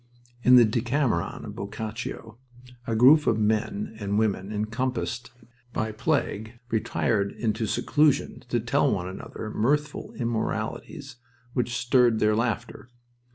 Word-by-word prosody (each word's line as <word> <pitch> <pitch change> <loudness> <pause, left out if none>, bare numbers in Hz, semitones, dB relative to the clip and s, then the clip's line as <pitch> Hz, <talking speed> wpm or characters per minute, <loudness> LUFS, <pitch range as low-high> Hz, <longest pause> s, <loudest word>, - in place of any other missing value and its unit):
In 125 +1 +7
the 120 -2 +8
Decameron 115 - 0
of - - -8
Boccaccio 110 +2 -6 0.5
a 115 - 0
group 140 +7 +6
of 110 - +3
men 105 0 -1
and 100 -1 -1
women 105 -2 0
encompassed 115 +2 -2 0.4
by 110 0 -1
plague 110 +1 -1
retired 110 -2 0
into 110 -1 -1
seclusion 150 +6 +1
to - - +1
tell - - +2
one 90 - -1
another 100 +3 -7
mirthful 150 +8 0
immoralities 115 +2 -3 0.4
which 120 -2 -1
stirred 120 -1 +3
their 105 0 +3
laughter. 115 +2 -2
115 Hz, 120 wpm, -26 LUFS, 110-125 Hz, 0.5 s, the